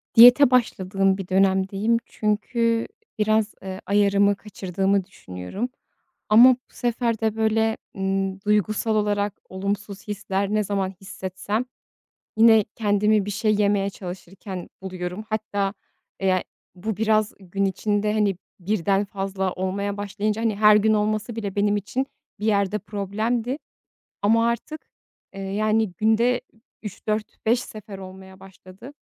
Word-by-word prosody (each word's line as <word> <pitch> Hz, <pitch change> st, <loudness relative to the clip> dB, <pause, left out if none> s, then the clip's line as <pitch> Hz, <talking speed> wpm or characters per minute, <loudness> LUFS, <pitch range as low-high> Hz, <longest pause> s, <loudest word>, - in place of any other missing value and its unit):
Diyete 245 Hz, +3 st, +9 dB
başladığım 195 Hz, -5 st, +2 dB
bir 195 Hz, -, -6 dB
dönemdeyim. 195 Hz, +4 st, +2 dB
Çünkü 230 Hz, +2 st, 0 dB, 0.3 s
biraz, 215 Hz, 0 st, +2 dB
eee, 190 Hz, 0 st, -6 dB
ayarımı 200 Hz, 0 st, +3 dB
kaçırdığımı 195 Hz, -1 st, -1 dB
düşünüyorum. 90 Hz, -, -6 dB, 0.6 s
Ama 235 Hz, +5 st, +9 dB
bu 255 Hz, +1 st, -5 dB
sefer 235 Hz, -2 st, -1 dB
de, 220 Hz, -1 st, 0 dB
böyle, 220 Hz, 0 st, +1 dB, 0.2 s
ımm, 195 Hz, 0 st, -1 dB
duygusal 210 Hz, +2 st, +1 dB
olarak 205 Hz, -1 st, +1 dB, 0.2 s
olumsuz 200 Hz, +1 st, -4 dB
hisler 200 Hz, -1 st, -2 dB
ne 215 Hz, -, +2 dB
zaman 195 Hz, -1 st, -1 dB
hissetsem, 190 Hz, +4 st, -4 dB, 0.7 s
yine 220 Hz, -2 st, +6 dB
kendimi 210 Hz, -1 st, +2 dB
bir 205 Hz, -, -3 dB
şey 215 Hz, +1 st, +1 dB
yemeye 200 Hz, -1 st, +2 dB
çalışırken 185 Hz, 0 st, -8 dB
buluyorum. 185 Hz, +2 st, -5 dB
Hatta, 205 Hz, -2 st, -1 dB, 0.5 s
eee, 195 Hz, -, +1 dB
ya, 185 Hz, -1 st, +2 dB, 0.3 s
bu, 210 Hz, +3 st, -4 dB
biraz 215 Hz, -1 st, +2 dB
gün 195 Hz, +1 st, -2 dB
içinde, 205 Hz, +2 st, 0 dB
hani, 210 Hz, -3 st, +2 dB, 0.2 s
1'den 195 Hz, +1 st, +1 dB
fazla 195 Hz, -1 st, -3 dB
olmaya 200 Hz, +2 st, -2 dB
başlayınca; 205 Hz, +2 st, -2 dB
hani, 225 Hz, -2 st, +1 dB
her 210 Hz, +1 st, +6 dB
gün 215 Hz, +1 st, +4 dB
olması 215 Hz, +2 st, 0 dB
bile 205 Hz, -4 st, -4 dB
benim 205 Hz, 0 st, +2 dB
için 250 Hz, +6 st, -2 dB, 0.3 s
bir 210 Hz, -, -3 dB
yerde 205 Hz, -1 st, +1 dB
problemdi, 220 Hz, +6 st, -2 dB, 0.7 s
ama 230 Hz, +3 st, +4 dB
artık, 265 Hz, +7 st, -4 dB, 0.5 s
eee, 195 Hz, -, -7 dB
yani, 215 Hz, +1 st, 0 dB
günde 225 Hz, +6 st, +2 dB, 0.4 s
3-4-5 215 Hz, +3 st, -2 dB
sefer 215 Hz, -4 st, -9 dB
olmaya 190 Hz, 0 st, -11 dB
başladı 195 Hz, +5 st, -13 dB
205 Hz, 125 wpm, -24 LUFS, 195-220 Hz, 0.7 s, Diyete